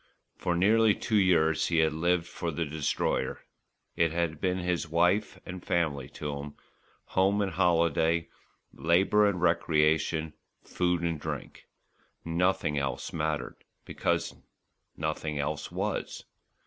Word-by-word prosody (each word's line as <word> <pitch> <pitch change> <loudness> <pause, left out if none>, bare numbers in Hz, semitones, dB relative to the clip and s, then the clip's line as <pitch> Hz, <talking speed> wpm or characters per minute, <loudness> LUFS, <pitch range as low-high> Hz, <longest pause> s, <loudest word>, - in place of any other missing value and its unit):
For 90 - -1
nearly 105 +4 +4
two 110 -3 +1
years 80 -5 +3
he 85 - 0
had 80 -1 +3
lived 85 +2 +1
for 85 0 -5
the 80 +1 -2
Destroyer. 75 -1 -2 0.5
It 85 -1 +2
had 80 -2 -2
been 90 -1 +1 0.3
wife 90 +6 +1
and 90 -1 -7
family 75 -6 -1
to 75 -1 -5
him, 70 +1 -8 0.5
home 95 +2 +1
and 100 -2 0
holiday, 85 -1 +2 0.5
labour 95 +5 +3
and 100 -3 0
recreation, 80 -2 +2 0.3
food 90 -1 0
and 85 -2 -1
drink. - - -6 0.6
Nothing 85 -3 +1
else 70 -1 -3
mattered, 80 -2 -3 0.2
because - - -1 0.6
nothing 80 -1 -3
else 75 +1 -3
was. - - -3
85 Hz, 120 wpm, -29 LUFS, 80-90 Hz, 0.6 s, nearly